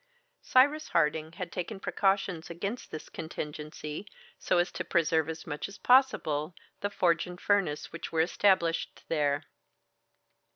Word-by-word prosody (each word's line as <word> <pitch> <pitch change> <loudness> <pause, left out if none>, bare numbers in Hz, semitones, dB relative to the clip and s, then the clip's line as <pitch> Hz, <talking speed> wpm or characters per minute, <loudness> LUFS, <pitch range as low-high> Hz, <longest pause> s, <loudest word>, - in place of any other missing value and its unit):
Cyrus 290 +4 +4
Harding 155 +1 +1
had 180 -1 -6
taken 190 +3 -4
precautions 195 -4 0
against 200 +8 -4
this 155 - -7
contingency, 155 +2 -6 0.3
so - - +1
as 175 +1 +2
to - - -4
preserve 160 -2 +2
as 160 0 -6
much 150 +4 -4
as 200 - -11
possible 180 - +3 0.2
the 205 - -1
forge 170 -4 +2
and 180 0 -8
furnace 180 -8 +1
which 170 0 -6
were 160 - +3
established 170 -1 +2
there. 145 -2 +1
170 Hz, 135 wpm, -30 LUFS, 155-195 Hz, 0.3 s, Cyrus